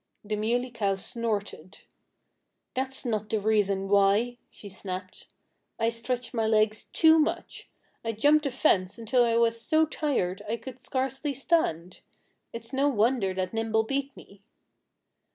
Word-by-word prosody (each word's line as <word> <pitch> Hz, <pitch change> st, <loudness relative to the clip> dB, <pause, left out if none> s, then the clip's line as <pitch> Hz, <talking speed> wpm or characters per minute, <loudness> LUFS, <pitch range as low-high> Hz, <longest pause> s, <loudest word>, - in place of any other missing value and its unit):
The 210 Hz, 0 st, -2 dB
Muley 240 Hz, +4 st, -1 dB
Cow 200 Hz, -4 st, 0 dB
snorted. 205 Hz, -4 st, -4 dB, 0.9 s
"That's 265 Hz, +1 st, -1 dB
not 215 Hz, -3 st, -2 dB
the 220 Hz, -, 0 dB
reason 200 Hz, -2 st, +1 dB
why," 205 Hz, +5 st, +3 dB
she 205 Hz, -, -11 dB
snapped. 185 Hz, -1 st, -7 dB, 0.5 s
"I 225 Hz, 0 st, +1 dB
stretched 235 Hz, +1 st, -3 dB
my 225 Hz, -2 st, 0 dB
legs 215 Hz, 0 st, +2 dB
too 320 Hz, 0 st, +5 dB
much. 305 Hz, -, -2 dB, 0.3 s
I 225 Hz, -1 st, -2 dB
jumped 295 Hz, +7 st, +3 dB
the -, -, +1 dB
fence 200 Hz, -8 st, +1 dB
until 230 Hz, +2 st, +2 dB
I 230 Hz, -1 st, +2 dB
was 230 Hz, 0 st, +2 dB
so 315 Hz, +5 st, +3 dB
tired 270 Hz, -13 st, -1 dB
I 230 Hz, -, -1 dB
could 260 Hz, +1 st, -10 dB
scarcely 265 Hz, +2 st, -2 dB
stand. 185 Hz, -, 0 dB, 0.5 s
It's 230 Hz, +2 st, -8 dB
no 275 Hz, +2 st, +2 dB
wonder 225 Hz, -4 st, +1 dB
that 185 Hz, +1 st, -2 dB
Nimble 225 Hz, 0 st, +1 dB
beat 275 Hz, +4 st, -3 dB
me." 200 Hz, 0 st, -15 dB
230 Hz, 145 wpm, -27 LUFS, 205-260 Hz, 0.9 s, too